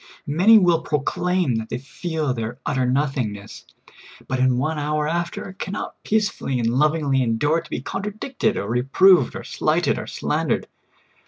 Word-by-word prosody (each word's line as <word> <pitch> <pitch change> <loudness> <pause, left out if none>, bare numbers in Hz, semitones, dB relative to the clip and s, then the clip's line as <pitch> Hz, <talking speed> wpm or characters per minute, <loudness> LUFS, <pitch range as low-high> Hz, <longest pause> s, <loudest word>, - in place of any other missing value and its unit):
Many 185 +10 +6
wdll 175 -5 +3
proclaim 160 -1 0
that 110 0 -5
they - - -3
feel 150 +2 -3
their 115 0 -4
utter 130 -2 0
nothingness, 125 -7 -2 0.6
but 130 - -2
in 130 -1 +3
one 155 +4 -1
hour 150 +1 -1
after 170 +3 -3
can 195 - -4
not - - -6
peacefully 205 -11 0
and 115 -2 +1
lovingly 145 -1 +2
endure 140 +8 +1
to 165 - -16
be - - -4
contradicted, 210 - -2
or 100 - -3
reproved, 135 - +4
or - - -6
slighted, - - 0
or - - -7
slandered. - - -1
150 Hz, 155 wpm, -22 LUFS, 125-175 Hz, 0.6 s, Many